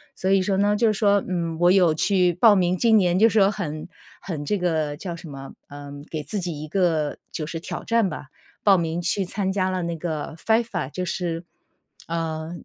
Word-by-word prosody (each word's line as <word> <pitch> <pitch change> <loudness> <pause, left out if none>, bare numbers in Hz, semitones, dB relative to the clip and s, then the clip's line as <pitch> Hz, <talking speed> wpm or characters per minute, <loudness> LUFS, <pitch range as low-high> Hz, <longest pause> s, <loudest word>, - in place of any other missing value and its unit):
所 190 +1 -1
以 195 -1 +4
说 190 0 0
呢， 205 +1 +3
就 225 +2 +2
是 215 - +3
说， 205 -2 +3
嗯， 170 -3 -2
我 175 +1 +5
有 180 -5 +4
去 180 +1 +2
报 205 +4 +6
名 180 -1 +2
今 220 +3 +4
年 180 -1 +2
就 225 +1 +6
是 220 - -1
说 195 +1 +5
很 155 -7 -5 0.3
很 165 -5 -5
这 210 - 0
个 160 -5 -1
叫 175 -1 -5
什 170 -2 -10
么， 135 -1 -9 0.2
呃， 145 0 -9 0.2
给 155 -2 -4
自 200 +8 -4
己 170 -5 -4
一 155 - -6
个 160 -4 0
就 155 - -4
是 165 +1 -5
挑 - - -6
战 230 -4 +2
吧， 145 -2 -7 0.4
报 195 -2 +6
名 165 +1 -2
去 185 +3 0
参 190 +1 -2
加 190 -1 0
了 185 -1 -2
那 170 0 -2
个 160 -1 -4
FIFA， 225 - 0
就 180 +3 -4
是， 170 -1 -3 0.6
呃， 165 -1 -3
175 Hz, 240 characters per minute, -24 LUFS, 160-195 Hz, 0.6 s, 报